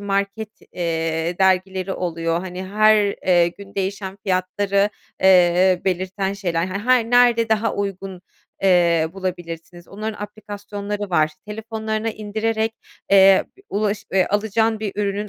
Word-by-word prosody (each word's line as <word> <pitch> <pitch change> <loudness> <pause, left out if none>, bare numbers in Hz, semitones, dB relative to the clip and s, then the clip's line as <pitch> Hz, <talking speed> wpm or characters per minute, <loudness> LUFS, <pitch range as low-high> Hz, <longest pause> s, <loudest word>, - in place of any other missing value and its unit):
market, 200 +2 -2 0.2
eee, 165 0 -2
dergileri 190 0 +1
oluyor. 165 -1 -2
Hani, 185 0 -6
her, 215 +1 +4 0.2
eee, 175 -2 +4
gün 200 +3 -13
değişen 195 0 -3
fiyatları, 195 +2 +1 0.3
eee, 180 -1 +5
belirten 190 +1 -1
şeyler, 175 -4 -2
her 190 +1 -4
hani, 245 0 +2
nerede 240 -2 +4
daha 220 0 +1
uygun, 195 -2 -4 0.4
eee, 170 -4 +3
bulabilirsiniz 175 -2 -6
onların 215 +1 -6
aplikasyonları 205 -1 -6
var. 155 -2 +2 0.2
Telefonlarına 220 +1 -3
indirerek, 220 +1 -2 0.4
eee, 195 -1 +6 0.2
ulaş 205 0 -1
eee, 190 -1 +3
alacağın 220 +1 0
bir 210 -3 -3
ürünün 205 0 -2
195 Hz, 120 wpm, -21 LUFS, 180-210 Hz, 0.4 s, eee